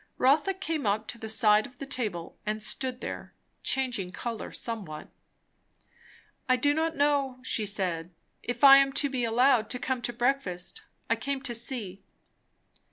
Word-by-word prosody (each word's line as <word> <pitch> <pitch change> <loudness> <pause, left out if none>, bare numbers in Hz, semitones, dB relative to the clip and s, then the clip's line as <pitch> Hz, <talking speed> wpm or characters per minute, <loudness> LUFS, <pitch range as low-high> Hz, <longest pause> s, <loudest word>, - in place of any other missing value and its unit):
Rotha 300 +9 +3
came 320 - -2
up 210 +2 +1
to 235 - -5
the 220 - -6
side 215 -2 +4
of 255 - -19
the 275 - -6
table 215 -11 -3
and 215 0 -2
stood 255 +2 -1
there, - - -6 0.3
changing 245 -8 0
colour 225 +4 -5
somewhat. 195 -10 -5 1.4
"I 255 - +6
do 285 +3 +2
not 320 +1 0
know," 280 -2 +1
she 215 -4 0
said, 180 -4 -2 0.3
"if 245 +2 -5
I 275 -1 +11
am 275 0 +3
to 285 0 +2
be 255 -2 -1
allowed 235 0 +3
to - - -3
come 260 0 -2
to 240 - -2
breakfast. 240 - -1 0.3
I - - +2
came 275 -1 -3
to 240 - -2
see." 230 -5 -3
245 Hz, 165 wpm, -28 LUFS, 215-275 Hz, 1.4 s, I